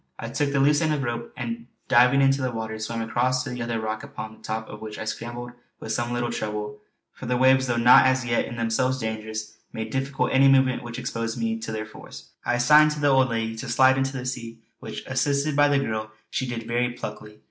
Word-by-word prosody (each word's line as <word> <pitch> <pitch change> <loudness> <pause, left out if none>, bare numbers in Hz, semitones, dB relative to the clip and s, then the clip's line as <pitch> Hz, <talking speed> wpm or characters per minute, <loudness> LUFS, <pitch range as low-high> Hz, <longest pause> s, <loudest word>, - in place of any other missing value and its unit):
I - - -6
took 145 -1 -1
the 140 - +1
loose 145 +2 +4
end 160 -1 +1
of 145 - -2
the - - -2
rope 120 0 -4
and 120 -1 -5 0.2
diving 130 +2 +5
into 135 0 +3
the 130 - 0
water 110 -1 -5
swam 115 +1 -3
across 125 +3 0
to 130 - -6
the 125 0 -5
other 115 -1 -2
rock 110 0 -3
upon 110 0 -7
the - - -19
top 110 0 -4
of 105 - -10
which 110 -1 -7
I - - -5
scrambled 120 +2 -5 0.3
with 110 - -6
some 120 +2 -1
little 120 -1 -1
trouble, 105 -1 -4 0.3
for - - -9
the 125 0 +1
waves, 130 +1 +4
though 120 - 0
not 120 +2 +7
as 130 -1 +1
yet 120 -1 +1
in 120 - -7
themselves 115 +3 0
dangerous, 110 -2 -5 0.2
made 110 0 -5
difficult 135 +2 -1
any 135 +1 +6
movement 130 -1 +4
which 120 0 -7
exposed 115 -2 -3
me 225 0 -1
to 225 - -5
their 110 0 -3
force. 110 - -12
I 120 - +1
signed 150 +5 +6
to 150 - -6
the 145 -1 +3
old 130 -1 +4
lady 115 -1 -2
to 125 +2 -6
slide 130 +2 +5
into 135 0 -1
the 125 - -5
sea 115 -3 -6 0.2
which, - - -7
assisted 145 +1 0
by 145 0 +5
the 145 -1 +3
girl, 110 -5 -2 0.2
she 130 - -2
did 120 -1 -4
very 120 +2 0
pluckily. 105 -3 -8
120 Hz, 240 wpm, -25 LUFS, 115-130 Hz, 0.3 s, not